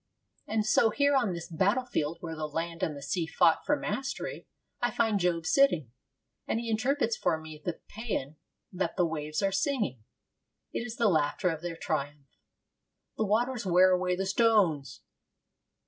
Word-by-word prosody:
And 215 Hz, -1 st, 0 dB
so 220 Hz, +1 st, +4 dB
here 285 Hz, +5 st, +2 dB
on 240 Hz, -7 st, +2 dB
this 170 Hz, -1 st, -5 dB
battle 200 Hz, +10 st, +1 dB
field 160 Hz, -8 st, -2 dB
where 165 Hz, -2 st, -5 dB
the 155 Hz, -1 st, -3 dB
land 165 Hz, +2 st, -4 dB
and 150 Hz, -2 st, -1 dB
the 140 Hz, -, -9 dB
sea 165 Hz, +4 st, -1 dB
fought 165 Hz, 0 st, +3 dB
for 295 Hz, -, +4 dB
mastery, 275 Hz, -, -4 dB, 0.3 s
I -, -, +2 dB
find 220 Hz, -3 st, +1 dB
Job 170 Hz, -2 st, 0 dB
sitting, 175 Hz, -, +3 dB, 0.6 s
and 225 Hz, -, 0 dB
he 230 Hz, -1 st, -3 dB
interprets 230 Hz, +1 st, +1 dB
for 160 Hz, -, 0 dB
me 155 Hz, -1 st, -10 dB
the 175 Hz, -, -4 dB
paean 200 Hz, -, -4 dB, 0.3 s
that 190 Hz, +1 st, -2 dB
the 180 Hz, -, +3 dB
waves 155 Hz, +1 st, -3 dB
are 195 Hz, -, +2 dB
singing. 195 Hz, -, -1 dB, 0.7 s
It -, -, -1 dB
is 235 Hz, -, -6 dB
the 235 Hz, -2 st, +2 dB
laughter 165 Hz, +1 st, +2 dB
of 160 Hz, -1 st, -5 dB
their 175 Hz, -1 st, -5 dB
triumph. 145 Hz, -3 st, -4 dB, 0.8 s
'The 220 Hz, -, 0 dB
waters 240 Hz, +4 st, +1 dB
wear 185 Hz, 0 st, +5 dB
away 180 Hz, 0 st, +1 dB
the 190 Hz, +1 st, -2 dB
stones.' 190 Hz, -, +2 dB
180 Hz, 170 wpm, -29 LUFS, 160-225 Hz, 0.8 s, wear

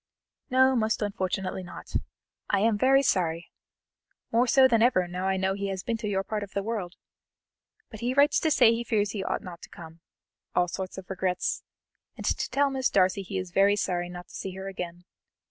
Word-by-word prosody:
"No, 260 Hz, +1 st, +4 dB
most 220 Hz, -2 st, +1 dB
unfortunately 190 Hz, -2 st, -2 dB
not. 180 Hz, -, -10 dB, 0.5 s
I 200 Hz, -, +2 dB
am 225 Hz, 0 st, +3 dB
very 270 Hz, +5 st, +4 dB
sorry, 170 Hz, -7 st, 0 dB, 0.8 s
more 240 Hz, +2 st, +3 dB
so 265 Hz, +1 st, +6 dB
than 230 Hz, -3 st, +3 dB
ever 225 Hz, -7 st, +3 dB
now 180 Hz, +2 st, -3 dB
I 190 Hz, 0 st, +1 dB
know 190 Hz, 0 st, +1 dB
he 200 Hz, 0 st, -3 dB
has 190 Hz, -1 st, -4 dB
been 230 Hz, -, -1 dB
to 220 Hz, -1 st, -4 dB
your 195 Hz, -1 st, 0 dB
part 210 Hz, +2 st, -3 dB
of 200 Hz, -1 st, -8 dB
the 200 Hz, -, 0 dB
world. 200 Hz, -5 st, -4 dB, 1.0 s
But 215 Hz, -, -9 dB
he 245 Hz, +3 st, -1 dB
writes 285 Hz, +1 st, +5 dB
to 320 Hz, -, +1 dB
say 230 Hz, -6 st, +5 dB
he 230 Hz, +1 st, -2 dB
fears 210 Hz, -3 st, 0 dB
he 200 Hz, -2 st, -3 dB
ought -, -, -2 dB
not 175 Hz, -2 st, -9 dB
to -, -, -11 dB
come 165 Hz, 0 st, -12 dB, 0.6 s
all 180 Hz, 0 st, +3 dB
sorts 185 Hz, +2 st, -5 dB
of 190 Hz, -1 st, -8 dB
regrets, 185 Hz, -1 st, -1 dB, 0.6 s
and -, -, -7 dB
to -, -, 0 dB
tell 280 Hz, 0 st, +2 dB
Miss 265 Hz, -1 st, +1 dB
Darcy 185 Hz, +1 st, +2 dB
he 195 Hz, 0 st, -5 dB
is 185 Hz, -1 st, -4 dB
very 200 Hz, +3 st, +4 dB
sorry 175 Hz, -3 st, -1 dB
not 180 Hz, 0 st, -9 dB
to -, -, -16 dB
see 190 Hz, -1 st, -6 dB
her 190 Hz, 0 st, -6 dB
again. 175 Hz, -2 st, -6 dB
195 Hz, 210 wpm, -27 LUFS, 185-230 Hz, 1.0 s, so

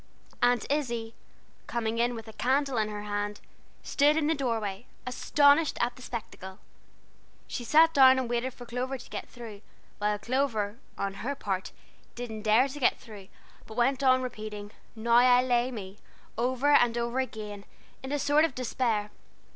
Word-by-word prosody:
Aunt 245 Hz, -2 st, +3 dB
Izzie, 235 Hz, -6 st, -2 dB, 0.5 s
coming 230 Hz, -1 st, -2 dB
in 240 Hz, +1 st, +1 dB
with 225 Hz, -1 st, -8 dB
a 220 Hz, -, -10 dB
candle 270 Hz, +2 st, 0 dB
in 215 Hz, -1 st, 0 dB
her 210 Hz, -1 st, -6 dB
hand, 205 Hz, 0 st, -3 dB, 0.4 s
stood 295 Hz, +2 st, +3 dB
in 315 Hz, -, +1 dB
the 315 Hz, -, +2 dB
doorway, 230 Hz, -7 st, -3 dB, 0.2 s
astonished 285 Hz, +4 st, +3 dB
at 240 Hz, 0 st, 0 dB
the -, -, -14 dB
spectacle. 190 Hz, -6 st, -7 dB, 0.9 s
She 245 Hz, -, -5 dB
sat 320 Hz, +6 st, +5 dB
down 260 Hz, -1 st, +7 dB
and 260 Hz, -2 st, -1 dB
waited 240 Hz, +2 st, -1 dB
for 245 Hz, -, -10 dB
Clover 250 Hz, +3 st, -3 dB
to -, -, -13 dB
get -, -, -6 dB
through, 225 Hz, -5 st, -10 dB, 0.4 s
while 210 Hz, 0 st, +1 dB
Clover, 230 Hz, -3 st, -1 dB, 0.2 s
on 195 Hz, 0 st, -2 dB
her 280 Hz, +4 st, -2 dB
part, 195 Hz, -7 st, -3 dB, 0.4 s
didn't 230 Hz, -3 st, -6 dB
dare 220 Hz, +5 st, +4 dB
to 285 Hz, +2 st, -8 dB
get 250 Hz, -, +3 dB
through, 205 Hz, -4 st, -12 dB, 0.4 s
but 220 Hz, -, -11 dB
went 265 Hz, +3 st, +2 dB
on 255 Hz, -1 st, +4 dB
repeating 215 Hz, -4 st, -6 dB, 0.2 s
"Now 230 Hz, +1 st, -1 dB
I 250 Hz, 0 st, +6 dB
lay 245 Hz, -1 st, +1 dB
me" 205 Hz, -4 st, -8 dB, 0.4 s
over 255 Hz, +5 st, +1 dB
and 240 Hz, -4 st, +4 dB
over 235 Hz, +2 st, -1 dB
again, 210 Hz, -5 st, -5 dB, 0.4 s
in 265 Hz, -, -6 dB
a 290 Hz, -, +1 dB
sort 290 Hz, +2 st, +3 dB
of 325 Hz, -6 st, 0 dB
despair. 230 Hz, -4 st, -1 dB
240 Hz, 170 wpm, -28 LUFS, 215-260 Hz, 0.9 s, down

